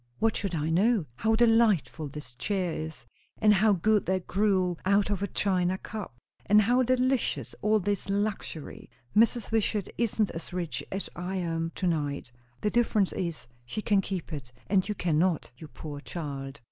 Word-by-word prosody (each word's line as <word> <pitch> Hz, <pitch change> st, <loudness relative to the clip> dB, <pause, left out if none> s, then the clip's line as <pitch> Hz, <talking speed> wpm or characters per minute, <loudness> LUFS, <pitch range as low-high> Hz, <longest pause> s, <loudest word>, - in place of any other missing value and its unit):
"What 225 Hz, 0 st, +2 dB
should 195 Hz, -4 st, -2 dB
I 155 Hz, +1 st, -1 dB
know?" 200 Hz, +2 st, +3 dB
"How 220 Hz, +1 st, +2 dB
delightful 225 Hz, -9 st, +3 dB
this 140 Hz, -3 st, -9 dB
chair 180 Hz, -, -1 dB
is; 160 Hz, 0 st, -6 dB, 0.3 s
and 215 Hz, -1 st, +5 dB
how 210 Hz, +2 st, +4 dB
good 210 Hz, +3 st, +3 dB
that 185 Hz, -1 st, 0 dB
gruel, 185 Hz, -3 st, +1 dB
out 200 Hz, +1 st, +3 dB
of 200 Hz, -2 st, -1 dB
a 200 Hz, -, 0 dB
china 185 Hz, -2 st, +1 dB
cup; 200 Hz, -, -7 dB, 0.3 s
and 210 Hz, +1 st, +7 dB
how 245 Hz, +4 st, +3 dB
delicious 255 Hz, 0 st, +1 dB
all 215 Hz, +1 st, +3 dB
this 200 Hz, 0 st, -2 dB
luxury! 200 Hz, -6 st, -3 dB, 0.3 s
Mrs. 230 Hz, 0 st, +3 dB
Wishart 215 Hz, -3 st, 0 dB
isn't 220 Hz, -3 st, +1 dB
as 165 Hz, +2 st, -7 dB
rich 175 Hz, -3 st, -3 dB
as 195 Hz, +1 st, -3 dB
I 180 Hz, +2 st, -4 dB
am 165 Hz, -2 st, -1 dB
to 190 Hz, -, -2 dB
night." 145 Hz, -6 st, -1 dB, 0.3 s
"The 210 Hz, -, +1 dB
difference 220 Hz, -5 st, +2 dB
is, 170 Hz, -7 st, -3 dB, 0.2 s
she 165 Hz, -, -5 dB
can 200 Hz, -2 st, +3 dB
keep 185 Hz, -3 st, -5 dB
it, 135 Hz, -4 st, -6 dB
and 195 Hz, 0 st, +1 dB
you 210 Hz, -, -1 dB
cannot, 170 Hz, -1 st, +1 dB
you 155 Hz, -, -9 dB
poor 150 Hz, -1 st, -8 dB
child!" 140 Hz, -3 st, -6 dB
190 Hz, 170 wpm, -28 LUFS, 165-215 Hz, 0.3 s, and